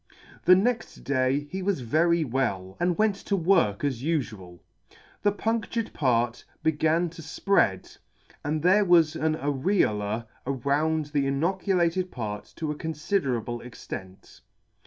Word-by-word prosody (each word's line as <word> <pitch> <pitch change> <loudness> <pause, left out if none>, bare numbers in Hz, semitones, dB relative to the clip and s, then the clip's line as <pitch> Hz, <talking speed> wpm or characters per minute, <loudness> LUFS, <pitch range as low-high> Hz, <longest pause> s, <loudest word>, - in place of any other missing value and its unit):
The 180 - +8
next 225 +5 -1
day 135 0 +1
he 190 - -3
was 185 -6 0
very 165 +7 +2
well, 115 -9 -2
and 175 -1 +1
went 215 -1 +3
to 200 - -2
work 165 - +2
as 130 -5 -1
ufual. 110 - -3 0.6
The 205 - +3
punc 220 +2 -1
tured 230 -2 -3
part 120 -3 +1 0.2
began 160 +2 +2
to 165 - -10
fpread, 155 - 0 0.4
and 150 +1 -2
there 190 +4 +5
was 170 -4 +5
the 165 - -6
areola 140 - 0 0.2
around 145 +4 0
the 140 -2 +2
inoculated 180 +4 +1
part 105 -7 -6
to 155 -2 -3
a - - -4
confiderable 145 - -2
extent. 95 -5 -9
155 Hz, 135 wpm, -26 LUFS, 125-180 Hz, 0.6 s, The